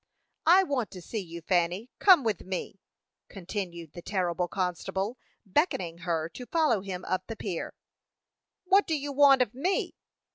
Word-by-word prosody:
"I 365 +3 +7
want 265 - -1
to 185 - -8
see 220 - -4
you, 170 -3 -7
Fanny; 180 +6 0
come 370 -8 +7
with 220 -5 -1
me," 190 +1 -5 0.5
continued 175 -4 -6
the 175 - -8
terrible 180 -2 -1
constable, 190 +5 -2 0.3
beckoning 185 - 0
her 165 -2 -1
to 245 +9 -9
follow 310 - +2
him 185 -2 -6
up 185 0 -2
the 225 - -5
pier. 195 -5 -5 0.9
"What 390 +2 +4
do 320 -3 +1
you 285 0 -4
want 275 -2 +6
of 215 - -9
me?" 345 +10 -1
195 Hz, 155 wpm, -28 LUFS, 175-275 Hz, 0.9 s, I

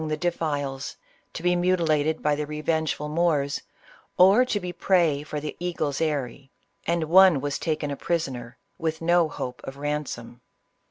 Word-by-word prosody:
the 155 0 -1
defiles, 145 -5 -2 0.3
to 165 - -7
be 180 0 +3
mutilated 160 -4 +1
by 150 - +3
the 150 0 -2
revengeful 155 0 -1
Moors, 150 -3 +1 0.6
or 195 +7 +7
to 235 -5 -1
be 180 -2 -5
prey 170 -5 +2
for 150 0 -5
the 150 0 -5
eagle's 165 -5 -2
eyrie; 140 -4 -2 0.4
and 170 0 +1
one 180 -1 +6
was 145 +1 -2
taken 155 -3 -2
a - - -2
prisoner, 130 -8 -3 0.2
with 160 -1 -2
no 170 -1 +3
hope 125 -3 -6
of 135 - -8
ransom. 140 -5 -4
155 Hz, 155 wpm, -25 LUFS, 145-170 Hz, 0.6 s, or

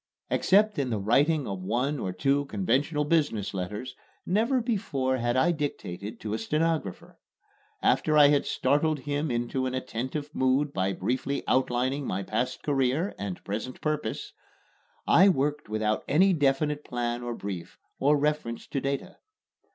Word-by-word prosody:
Except 210 -1 +3
in 135 -3 0
the 110 - 0
writing 140 +9 +2
of 95 -2 -4
one 130 +9 -1
or 95 - -2
two 140 +10 +1
conventional 150 -2 0
business 145 -12 +1
letters, 105 +7 -5 0.3
never 230 +8 +2
before 165 - -1
had 120 0 0
I 165 +7 +4
dictated 115 - -4
to 105 -1 -3
a 110 - -1
stenographer. 155 - -2 0.6
After 155 -1 +3
I 145 -1 +8
had 145 -1 +2
startled 150 0 +1
him 145 +2 -2
into 120 +2 -1
an 130 - -3
attentive 130 +4 -4
mood 135 +2 +1
by 95 0 0
briefly 130 +8 -2
outlining 130 +2 +1
my 95 +1 -2
past 120 +6 -2
career 140 +6 +1
and 100 -3 -5
present 110 +5 -5
purpose, 155 - -3 0.7
I 190 +3 +6
worked 150 - 0
without 110 0 0
any 190 +6 +4
definite 145 0 +1
plan 120 0 -2
or 120 -1 -4
brief, 95 -6 -6 0.2
or 145 +2 +4
reference 145 -5 -1
to 135 - -2
data. 140 0 -3
135 Hz, 150 wpm, -27 LUFS, 120-150 Hz, 0.7 s, I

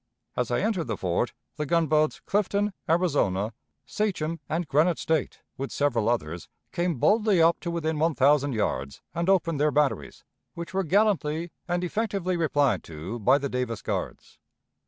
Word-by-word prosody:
As 125 -2 -1
I 120 - +1
entered 205 -5 0
the 110 -3 -2
fort, 95 +6 0 0.3
the 150 - -2
gunboats 155 -1 +2
Clifton, 205 0 0 0.2
Arizona, 140 - +1 0.3
Sachem, 165 -2 -2
and 165 +2 -1
Granite 155 +5 +3
State, 160 -4 -1 0.2
with 135 - -3
several 120 -6 +1
others, 85 -8 -2 0.2
came 175 -1 0
boldly 210 - +3
up 165 +1 +4
to 170 - -4
within 160 -2 -1
one 160 0 +2
thousand 140 0 +3
yards, 70 - -2
and 170 +2 -1
opened 165 -6 +2
their 150 +1 +3
batteries, 140 - 0 0.3
which 170 +2 -7
were 195 0 +1
gallantly 170 -4 +1 0.2
and 175 0 -1
effectively 195 -1 -1
replied 145 -5 +1
to 85 +9 -6
by 130 +6 +4
the 140 0 -2
Davis 125 -4 -3
Guards. - - -4
155 Hz, 155 wpm, -26 LUFS, 125-175 Hz, 0.3 s, up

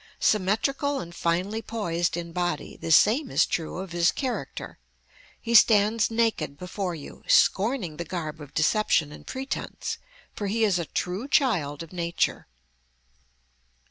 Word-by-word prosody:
Symmetrical 270 +8 +1
and 170 -7 -7
finely 180 +6 -1
poised 175 -8 -2
in 170 -1 -5
body, 175 0 -2
the 165 - -5
same 240 - +5
is - - +3
true 165 0 -3
of 190 -1 -6
his 170 0 +3
character. 260 -3 -5 0.6
He 235 - -3
stands 215 -1 +5
naked 225 -11 0
before 180 +1 -4
you, 145 - -10
scorning 195 - +3
the 170 - -3
garb 160 -3 -5
of 145 -2 -10
deception 160 -2 +2
and - - -12
pretence, 265 +1 -4 0.3
for 205 - -4
he 225 +3 0
is 195 -5 +3
a 170 - -2
true 185 - -3
child 165 - +1
of 165 - -13
nature. 170 -1 -1
185 Hz, 140 wpm, -26 LUFS, 170-225 Hz, 0.6 s, same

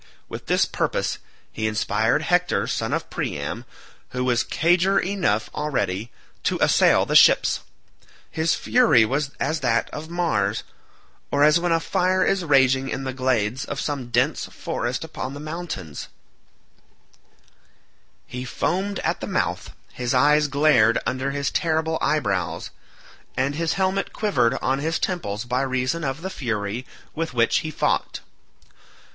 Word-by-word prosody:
With - - -8
this - - +3
purpose - - -2 0.3
he 110 - -2
inspired 110 0 +1
Hector - - +1
son - - -2
of - - -2
Priam, 70 0 -4 0.4
who 125 0 -3
was 125 -2 +1 0.2
eager 180 +3 +4
enough 175 - 0
already, 115 -7 -2 0.3
to - - 0
assail - - +4
the - - -2
ships. - - +6 0.7
His 160 0 +1
fury 235 - +4
was 140 +4 -1
as 155 0 0
that 120 -4 0
of 155 +1 -7
Mars, 110 - 0 0.7
or 145 0 +2
as 150 +2 +5
when 175 0 0
a 165 - +3
fire 185 +2 +1
is 195 -2 +1
raging 135 -3 +3
in 135 - -3
the 130 -1 -3
glades 130 -2 0
of 140 - -5
some 140 -5 -3
dense - - +1
forest 120 +5 -3
upon 140 -4 -6
the - - -7
mountains; 155 - -6 2.2
he 125 0 -6
foamed 190 +10 -1
at - - -1
the - - -5
mouth, - - -2 0.2
his 125 +1 -2
eyes 150 +3 +4
glared 140 -6 +4
under 130 +1 -1
his 140 0 -2
terrible 160 -1 0
eyebrows, 100 -12 -1 0.7
and 135 +2 +1
his 165 +2 -1
helmet 195 0 -1
quivered 125 - +1
on 135 +1 +1
his 160 +3 -1
temples 115 - -3
by 125 +1 0
reason 130 +4 -1
of 135 +3 -3
the 190 - -4
fury 115 - -3 0.3
with 160 -5 -4
which 115 -1 +3
he 155 - -4
fought. 155 - -1
140 Hz, 145 wpm, -23 LUFS, 120-165 Hz, 2.2 s, ships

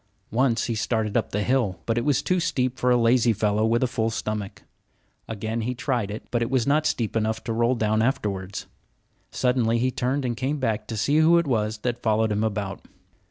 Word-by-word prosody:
Once 120 0 +2
he 120 - -1
started 110 -1 -1
up - - +1
the 105 +1 -1
hill; 120 -8 0
but 115 - 0
it 120 - 0
was 145 -1 +1
too 180 0 +1
steep 130 -6 -1
for 125 - +2
a 125 - +5
lazy 115 0 +3
fellow 105 +1 +1
with 115 +2 +2
a - - +3
full 115 -2 -1
stomach. 105 -2 -4 0.6
Again 110 +1 -3
he 125 +3 -2
tried 120 -4 -1
it; 105 +2 -6
but 120 - 0
it 115 - 0
was 130 -3 +1
not 150 +2 +2
steep 115 -2 -2
enough 110 0 -1
to 115 - -3
roll 120 +2 +2
down 110 -1 +1
afterwards. 100 -6 -2 0.6
Suddenly 125 -2 +1
he 130 +2 +1
turned 130 +2 -1
and 120 -1 -1
came 135 +5 -2
back 110 -5 -2
to 110 - -4
see 145 +8 +2
who 160 +2 +5
it 170 - +2
was 110 -5 0
that 120 0 -2
followed 110 0 +1
him 105 +1 0
about. 100 -3 -3
115 Hz, 215 wpm, -25 LUFS, 110-125 Hz, 0.6 s, a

